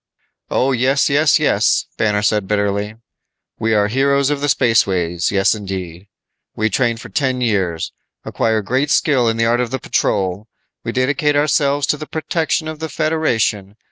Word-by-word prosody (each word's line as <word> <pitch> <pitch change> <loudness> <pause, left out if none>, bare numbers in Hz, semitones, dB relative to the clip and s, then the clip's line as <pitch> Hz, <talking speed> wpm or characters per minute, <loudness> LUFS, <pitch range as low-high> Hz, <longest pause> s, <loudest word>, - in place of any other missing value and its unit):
"Oh, 135 +2 +1
yes, 135 +3 +1
yes, 150 +2 +4
yes," - - +2
Banner 105 -1 0
said 105 -2 +1
bitterly. 100 +1 -1 0.6
"We 110 0 +1
are 105 -1 +3
heroes 140 +4 +1
of 145 -1 -2
the 145 - 0
spaceways; 95 - +1
yes, 100 -1 +3
indeed. 95 -3 -6 0.5
We 110 0 0
train 120 0 +1
for - - -10
ten 130 -3 -1
years. 95 -9 -1 0.3
Acquire 110 -2 0
great 130 +7 0
skill 130 -7 +2
in 115 - -1
the 115 - +2
art 120 +2 +2
of 125 - -2
the 130 - -2
patrol. 100 -4 -1 0.4
We - - -3
dedicate 145 +3 0
ourselves 145 -1 +2
to 150 - 0
the 155 0 -8
protection 160 -1 -2
of 155 -1 -6
the 160 0 -4
Federation. 125 -11 -1
115 Hz, 165 wpm, -18 LUFS, 105-140 Hz, 0.6 s, yes